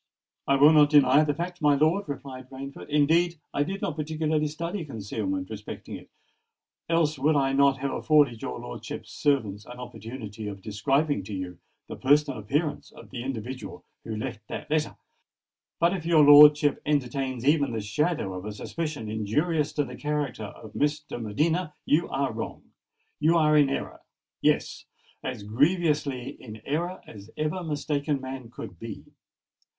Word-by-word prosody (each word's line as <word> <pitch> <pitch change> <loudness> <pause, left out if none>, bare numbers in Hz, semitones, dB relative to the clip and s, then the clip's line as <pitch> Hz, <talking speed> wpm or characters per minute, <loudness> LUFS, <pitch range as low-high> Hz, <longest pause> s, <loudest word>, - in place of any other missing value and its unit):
"I 140 - +4
will 145 +3 +7
not 150 -1 +6
deny 145 -1 +6
the 145 -1 0
fact, 175 +2 -5
my 145 -1 +5
lord," 155 +5 +2
replied 130 -2 -7
Rainford. 135 +2 -8
"Indeed, 160 +3 +3
I - - 0
did 195 +6 -2
not 145 - -1
particularly 155 0 0
study 170 +5 -4
concealment 155 - -4
respecting - - -7
it—else 170 - -4
would 150 +3 +3
I 135 -1 +2
not 140 0 +4
have 135 +1 -2
afforded 145 -7 +3
your 65 - -4
lordship's - - -7
servants 110 -9 0
an 125 - -10
opportunity 115 -3 -7
of 100 -2 -7
describing 135 +6 +1
to 100 - -5
you 90 -2 -6 0.3
the - - -7
personal 145 -2 +3
appearance 145 +9 -2
of - - -15
the 125 -3 -5
individual 130 0 -6 0.2
who 110 - -5
left 110 0 -4
that - - -7
letter. 155 -1 0 0.8
But 170 +2 +3
if 175 - -5
your 165 -2 +5
lordship 145 0 +8
entertains 130 -3 -1
even 145 -2 +3
the 115 - -2
shadow 110 - -1
of 90 0 -6
a 105 - -4
suspicion 150 +1 -4
injurious 145 - 0
to 145 - +1
the 125 -2 -8
character 145 -7 -2
of 105 +1 -11
Miss 150 +1 +1
de 145 -4 -8
Medina, 155 - 0
you 165 +3 +2
are 135 -1 -1
wrong—you 155 +7 -3
are 155 -1 +4
in 145 -2 +5
error!—yes—as 120 -5 -4
grievously 145 - +1
in 110 -3 -10
error 170 +6 -2
as 105 0 -12
ever 155 +4 -1
mistaken 145 -2 -1
man 130 -2 -7
could 100 -7 -9
be. 115 -3 -7
145 Hz, 155 wpm, -27 LUFS, 120-155 Hz, 0.8 s, lordship